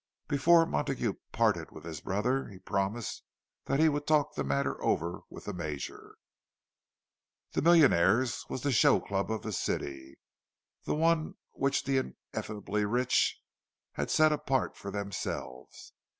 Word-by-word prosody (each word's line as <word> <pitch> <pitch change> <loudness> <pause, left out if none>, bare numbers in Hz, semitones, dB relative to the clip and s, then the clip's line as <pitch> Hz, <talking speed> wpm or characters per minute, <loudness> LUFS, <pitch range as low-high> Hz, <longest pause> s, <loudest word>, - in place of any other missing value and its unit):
Before 165 +3 +5
Montague 75 - -1 0.2
parted - - +1
with - - -12
his 80 -2 -7
brother, 125 +8 0
he 100 - -11
promised 100 +4 -2 0.4
that 135 - 0
he 160 - +6
would 145 -1 -1
talk 150 -1 +3
the - - -2
matter 70 0 -1
over 85 +2 0
with - - -11
the - - -4
Major. 75 -5 -6 1.4
The - - 0
Millionaires' 130 - +4
was 130 - -4
the 145 - +1
show 120 - +5
club 100 +1 -2
of 110 0 -2
the 110 - -4
city, 70 -6 -3 0.7
the - - 0
one 160 0 +1 0.2
which 135 0 0
the 135 -1 +1 0.4
ineffably 105 0 -2
rich 120 +5 +2 0.5
had - - -3
set 155 0 +5
apart 145 -3 0
for 100 - -7
themselves. 100 -10 -6
110 Hz, 140 wpm, -30 LUFS, 95-145 Hz, 1.4 s, he